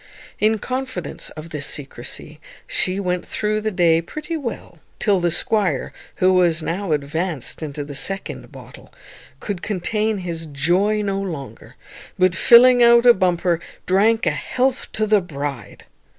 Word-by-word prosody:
In 220 +1 +3
confidence 255 -6 -5
of 160 +2 -9
this 145 -3 -2
secrecy 145 +2 -6 0.3
she 185 +1 0
went 180 -2 -2
through 215 0 -1
the 215 - -1
day 170 -4 +3
pretty 305 - -6
well, 235 - -6 0.2
till 200 -3 +2
the 175 -1 +1
squire, 180 - 0 0.2
who 185 0 +3
was 175 -3 +3
now 180 +2 -3
advanced 150 0 -2
into 145 -1 -5
the 145 0 -8
second 195 +8 -4
bottle, - - -13 0.5
could 200 -4 -5
contain 215 +2 -1
his 170 -3 -5
joy 180 +9 +1
no 195 -1 -1
longer, 160 -9 -7 0.4
but, 185 -1 +3
filling 245 +5 +7
out 235 0 +6
a 240 - +9
bumper, 175 -3 +1 0.3
drank 220 +5 +3
a - - +3
health 260 0 -1
to 215 - 0
the 210 -1 +3
bride. 145 -6 -6
185 Hz, 150 wpm, -21 LUFS, 160-215 Hz, 0.5 s, a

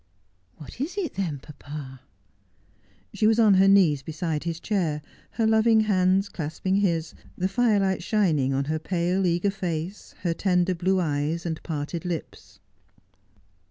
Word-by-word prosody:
' 90 0 -41
What 155 - -10
is 335 +8 -3
it 370 -6 -2
then, 175 -7 -2
papa? 140 -2 -10 0.5
' 95 - -37
She 215 - +2
was 220 0 +4
on 220 -3 +6
her 190 +1 +5
knees 180 -8 +5
beside 160 +1 -3
his 165 -1 -3
chair, 165 -8 -1 0.3
her 225 - 0
loving 220 0 +4
hands 195 -2 +2
clasping 185 +3 -2
his, 170 -5 0 0.2
the 185 - 0
firelight 195 -2 +1
shining 160 -11 +1
on 135 +1 0
her 155 +2 -2
pale, 180 +3 0
eager 175 +4 +1
face, 180 0 -5
her 170 -2 +1
tender 180 +1 +1
blue 185 +2 +1
eyes, 155 0 -1
and 160 -2 -3
parted 160 +2 -4
lips. 175 -4 -6
175 Hz, 155 wpm, -25 LUFS, 155-195 Hz, 0.5 s, on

